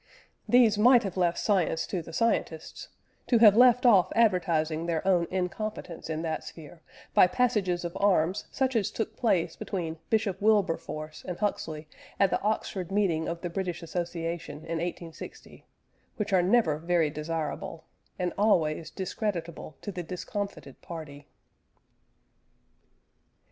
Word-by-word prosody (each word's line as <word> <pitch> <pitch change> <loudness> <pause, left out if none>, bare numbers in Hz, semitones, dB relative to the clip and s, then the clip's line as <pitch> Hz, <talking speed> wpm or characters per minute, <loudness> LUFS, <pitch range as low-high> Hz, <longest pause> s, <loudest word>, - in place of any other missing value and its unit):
These 235 -4 +5
might 245 +2 +6
have 195 -3 -4
left 175 -2 +1
science 185 -5 +1
to 185 - -3
the 165 - -11
scientists, 165 -5 -2 0.4
to 240 - +4
have 215 -3 +7
left 250 +1 +6
off 200 -7 +5
advertising 170 -7 +2
their 170 +2 -1
own 175 -3 +3
incompetence 185 -2 -4
in 160 0 -3
that 160 -1 -3
sphere 160 +1 -11 0.3
by - - +7
passages 200 -6 0
of 170 - -5
arms 185 -2 +2
such 265 -2 -1
as 210 -4 +1
took 225 - -4
place 195 -8 +1
between 165 -4 -4
Bishop 215 -4 0
Wilberforce 165 -7 0
and 180 -1 -4
Huxley 160 -7 -3 0.3
at 195 -2 +4
the - - 0
Oxford 195 -3 -2
meeting 185 -6 +1
of 170 0 -5
the 175 - -3
British 180 -1 -3
Association 170 -2 -4
in 165 0 -3
1860, 170 -1 -8 0.5
which 210 -4 -3
are 185 - +5
never 180 -5 +2
very 170 -2 +1
desirable, 155 +1 -4 0.3
and 180 -1 -2
always 165 -7 +2
discreditable 180 -5 -4
to 205 - -4
the 180 -2 -5
discomfited 180 -3 -6
party. 150 -4 -9
180 Hz, 140 wpm, -28 LUFS, 165-205 Hz, 0.5 s, have